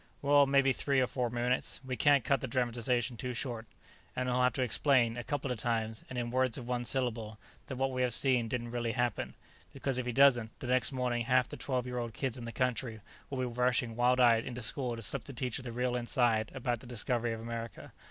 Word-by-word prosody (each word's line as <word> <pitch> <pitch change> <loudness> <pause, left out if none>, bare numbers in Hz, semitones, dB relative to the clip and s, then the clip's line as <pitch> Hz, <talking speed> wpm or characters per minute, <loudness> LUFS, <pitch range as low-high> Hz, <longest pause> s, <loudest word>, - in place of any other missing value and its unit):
"Well, 140 0 +5
maybe 135 -1 +4
three 140 0 +1
or 130 - +4
four 125 -1 -2
minutes. 120 +2 -1
We 130 -1 -3
can't 140 -1 +4
cut 140 +2 +1
the 130 - -3
dramatization 120 0 0
too 125 +1 -4
short 115 -3 -4 0.2
" - - -28
"And 130 0 -1
he'll 125 0 +1
have 125 0 +3
to 130 - 0
explain, 125 -1 +2
a 120 - -5
couple 140 -1 -3
of 120 - -3
times, 110 -1 -1
and 130 - -6
in 120 -1 -2
words 130 -1 +1
of 120 -3 -7
one 125 -1 -2
syllable, 115 -4 -1 0.3
that 130 - -5
what 135 +1 0
we 130 0 -2
have 125 -2 +4
seen 125 -4 +2
didn't 120 0 -3
really 120 -1 -2
happen, 120 -3 -1 0.4
because 135 -2 -2
if 125 - -3
he - - 0
doesn't, 120 -3 +4
the - - -7
next 130 +1 +2
morning 125 -3 -1
half 125 0 +3
the - - -8
twelve 130 -3 -2
year 125 0 -3
old 115 -2 -5
kids 130 -4 -2
in 120 -3 -7
the 115 - -5
country 120 -2 -2 0.3
will 135 - -4
be 130 - 0
rushing 125 -1 0
wild 125 +1 +3
eyed 115 -2 +5
into 125 -1 -6
school 125 +1 -2
to 115 - -6
slip 110 +3 -2
the 140 - -8
teacher 125 +1 -3
the 125 -2 -6
real 125 +1 -1
inside 120 -2 +1
about 120 -2 -1
the 125 - -13
discovery 120 0 +1
of 115 - -4
America. 115 -1 -7
125 Hz, 240 wpm, -32 LUFS, 115-130 Hz, 0.4 s, Well